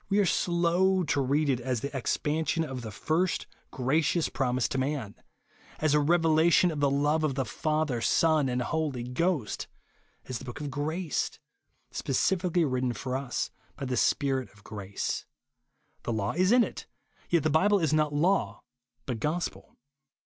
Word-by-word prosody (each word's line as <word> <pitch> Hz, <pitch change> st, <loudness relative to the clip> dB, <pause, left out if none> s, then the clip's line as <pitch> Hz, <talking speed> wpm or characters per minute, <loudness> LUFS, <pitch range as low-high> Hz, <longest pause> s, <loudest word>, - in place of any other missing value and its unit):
We 200 Hz, -, +2 dB
are 205 Hz, -, +4 dB
slow 180 Hz, +2 st, +2 dB
to 145 Hz, -3 st, +1 dB
read 145 Hz, +3 st, +1 dB
it 130 Hz, -3 st, +1 dB
as 125 Hz, -2 st, -2 dB
the 140 Hz, -, -3 dB
expan 150 Hz, +4 st, -1 dB
sion 165 Hz, +3 st, +1 dB
of 135 Hz, -5 st, -5 dB
the 115 Hz, -, -6 dB
Ri'st 160 Hz, -, 0 dB, 0.2 s
gracious 150 Hz, +6 st, +1 dB
promise 125 Hz, -2 st, 0 dB
to 135 Hz, -, -1 dB
man 130 Hz, -6 st, -2 dB, 0.6 s
;.,as 155 Hz, -1 st, +1 dB
a 150 Hz, -, +5 dB
revelation 165 Hz, +2 st, +4 dB
of 150 Hz, -, -4 dB
the 140 Hz, -1 st, +3 dB
love 145 Hz, +3 st, +1 dB
of 145 Hz, -4 st, 0 dB
the 135 Hz, -1 st, 0 dB
Father, 150 Hz, +3 st, -1 dB
Son 155 Hz, +4 st, +3 dB
and 125 Hz, 0 st, 0 dB
Holy 145 Hz, -4 st, -2 dB
Ghost; 130 Hz, -, -1 dB, 0.6 s
as 130 Hz, -2 st, -4 dB
the -, -, -10 dB
book 120 Hz, -, -7 dB
of 145 Hz, -1 st, -4 dB
grace, 155 Hz, +4 st, -2 dB, 0.5 s
specially 180 Hz, -2 st, +1 dB
written 130 Hz, -2 st, 0 dB
for 125 Hz, +3 st, -4 dB
us 130 Hz, -2 st, -2 dB, 0.2 s
by 140 Hz, -, -5 dB
the 130 Hz, -1 st, -1 dB
Spirit 135 Hz, +1 st, +1 dB
of 105 Hz, 0 st, -21 dB
grace. 100 Hz, -2 st, -4 dB, 0.7 s
The 120 Hz, -, -3 dB
law 105 Hz, -2 st, -1 dB
is 185 Hz, +4 st, +2 dB
in 245 Hz, 0 st, +6 dB
it, -, -, -6 dB, 0.4 s
yet 170 Hz, -4 st, +3 dB
the 155 Hz, -, +1 dB
Bible 200 Hz, +7 st, +4 dB
is 160 Hz, -5 st, +1 dB
not 155 Hz, -1 st, +2 dB
law, 170 Hz, +7 st, +1 dB, 0.4 s
but 125 Hz, -4 st, -3 dB
gospel. 160 Hz, +7 st, -3 dB
145 Hz, 170 wpm, -28 LUFS, 130-165 Hz, 0.7 s, in